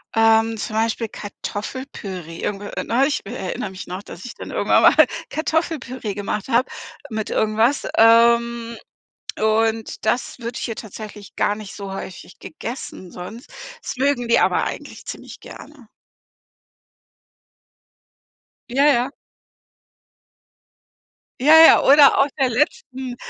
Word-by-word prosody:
Ähm, 225 0 +3
zum 215 0 -5
Beispiel 225 0 0
Kartoffelpüree. 205 - -7
Irgendwie, 205 0 -3
äh, - - -4
neulich, 275 +5 +1
w - - -8
äh, - - -6
erinnere 190 -2 -4
mich 185 - -9
noch, 180 +2 -6
dass 170 -2 -11
ich 245 - -7
dann - - -9
irgendwann - - +2
mal - - +7 0.2
Kartoffelpüree 305 - -2
gemacht 205 +1 -4
habe 250 +1 +2 0.4
mit 215 -2 -4
irgendwas, 220 +5 +1
ähm, 235 0 +4 0.6
und 220 +1 0
das 240 +4 -1
wird 235 +1 -5
hier 225 - -3
tatsächlich 210 -1 -10
gar 205 - +1
nicht 210 -2 -9
so 200 -1 -7
häufig 185 -1 -9
gegessen 235 - -8
sonst. 210 +7 -9 0.3
Das - - -5
mögen 260 -2 0
die 235 - +4
aber - - +2
eigentlich - - -7
ziemlich - - -9
gerne. 285 -7 -13 2.8
Ja, 275 +4 +2
ja. 270 -2 +3 2.3
Ja, 290 +5 +5
ja. - - +7
Oder 280 +1 +7
auf 275 - +3
der 265 -2 +3
letzten, 255 0 -2
230 Hz, 125 wpm, -21 LUFS, 210-255 Hz, 2.8 s, mal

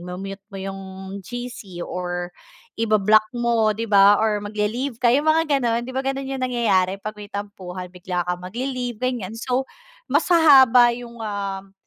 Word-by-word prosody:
mute 195 +2 -7
mo - - -7
yung 195 0 -5 0.4
GC 240 -5 -7
or 175 0 -4 0.4
iba-block 215 -1 +3
mo 235 -2 +2
di 225 - -2
ba, 200 0 +6
or 215 -1 +1
magle-leave 215 +5 -2
ka 245 - +4
yung 290 +4 +2
mga 310 -2 +3
ganon, 235 -2 0
'di - - -6
ba? - - +2
Gano'n 270 0 -2
yung 270 -1 -4
nangyayari 205 -7 +1
pag 215 +1 -5
may 205 - -9
tampuhan 190 -3 -6
bigla 180 -1 -3
kang 180 0 -2
magle-leave 245 +3 -4
ganiyan. 245 -6 -2
So, 250 +3 -1 0.4
mas - - +2
hahaba 265 -8 +7
yung, 240 -1 -10
um, 195 -2 -4
215 Hz, 160 wpm, -22 LUFS, 195-250 Hz, 0.4 s, hahaba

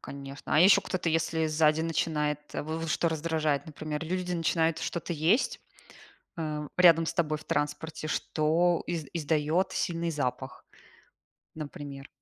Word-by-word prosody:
Конечно. 140 0 -6
А 155 - +6
еще 190 +3 +7
кто-то, 185 -2 -2
если 160 0 +1
сзади 155 0 +3
начинает, 155 -2 0
в - - -3 0.2
в - - -5
что 165 +2 +1
раздражает, 160 -2 -1
например, 155 0 -5
люди 180 +2 -2
начинают 165 -1 +1
что-то 170 0 -3
есть, 165 - +1 0.8
э, 150 -2 -3
рядом 165 -2 +7
с - - -2
тобой 155 -3 0
в 150 - -13
транспорте, 155 +2 -2
что 165 +3 +1
из 165 -3 -2
издает 160 +3 +1
сильный 170 -3 -1
запах, 140 -5 -4 0.9
например. 145 -2 -8
160 Hz, 140 wpm, -29 LUFS, 150-170 Hz, 0.9 s, еще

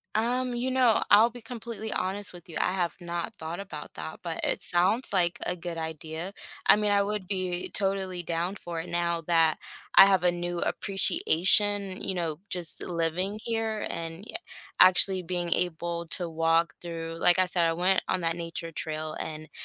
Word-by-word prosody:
Um, 245 +3 +1
you 240 +2 -1
know, 255 -4 +4
I'll 220 +4 +7
be 245 0 -10
completely 230 -2 -6
honest 195 +1 -2
with 175 -2 -13
you, 165 - -10
I - - +1
have 175 -3 0
not 170 0 -4
thought 165 +3 -6
about 165 -7 -8
that, 80 0 -7
but - - -4
it - - +1
sounds 185 +8 +1
like 180 -3 +2
a 180 - -1
good 170 -1 -6
idea, 160 +3 -5 0.3
I - - +8
mean, 210 0 +1
I 200 0 +4
would 210 -1 -2
be 185 -2 -2
totally 190 -3 0
down 170 +3 -2
for 175 -4 -6
it 170 +2 -6
now 170 -1 0
that 165 -2 +4 0.4
I - - +11
have 190 -3 +3
a 180 - +4
new 175 0 -3
appreciation, 195 +1 +1
you - - -1
know, 165 -4 -2
just 170 -5 -4
living 180 +4 -1
here 225 -2 -1
and 165 +2 -5
y - - -4 0.4
actually 185 0 +5
being 175 0 -2
able 170 -1 -1
to 175 0 -1
walk 165 +1 +2
through 165 -1 -6
like 175 +2 +5
I 185 - +5
said, 175 -1 +1
I 165 0 +2
went 185 +3 +2
on 185 - 0
that 165 -1 +1
nature 165 -1 -5
trail, 155 -1 -4
and 155 0 -5
175 Hz, 185 wpm, -28 LUFS, 165-200 Hz, 0.4 s, I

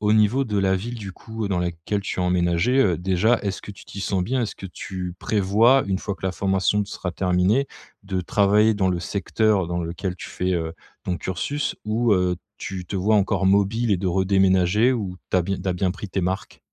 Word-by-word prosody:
au 105 0 +2
niveau 110 +5 +4
de 105 -4 -1
la 95 -1 +2
ville, 115 +6 -4
du 100 -4 -7
coup, 110 +1 -6
dans 95 -3 0
laquelle 85 +4 -2
tu 100 - -5
as - - +1
emménagé, 90 +7 +2
heu, 90 -9 +2
déjà, 95 +6 +2
est-ce 100 -1 -3
que - - -8
tu 95 - -13
t'y 100 - -8
sens 95 -2 0
bien? 130 +2 0
Est-ce 110 - -4
que 95 - -7
tu 90 -1 -6
prévois, 110 +6 +3
une 95 -1 0
fois 100 - -4
que 95 - -4
la 95 - -1
formation 95 +2 +1
sera 90 -2 -5
terminée, 95 +9 +2 0.4
de 95 -2 -2
travailler 105 +4 +3
dans 95 -2 +1
le 90 -1 0
secteur 100 +1 0
dans 85 0 -2
lequel 90 +2 -4
tu - - -8
fais, 90 +1 -2
heu, 80 -1 -2 0.3
ton 90 - -1
cursus 115 +12 -3
ou, 110 +1 +1
heu, 90 -1 +2 0.2
tu 90 -2 -6
te 100 - -4
vois 100 +4 +2
encore 100 -1 +1
mobile 100 +4 +2
et - - +3
de 95 - -2
redéménager? 95 +4 +3
Ou 100 -7 -3
tu - - +2
as 90 - +3
bi 95 +1 -3
tu 95 - -2
as - - +2
bien 90 +1 0
pris 105 +1 -7
tes 95 - -2
marques? 95 +1 -3
95 Hz, 225 wpm, -23 LUFS, 90-105 Hz, 0.4 s, niveau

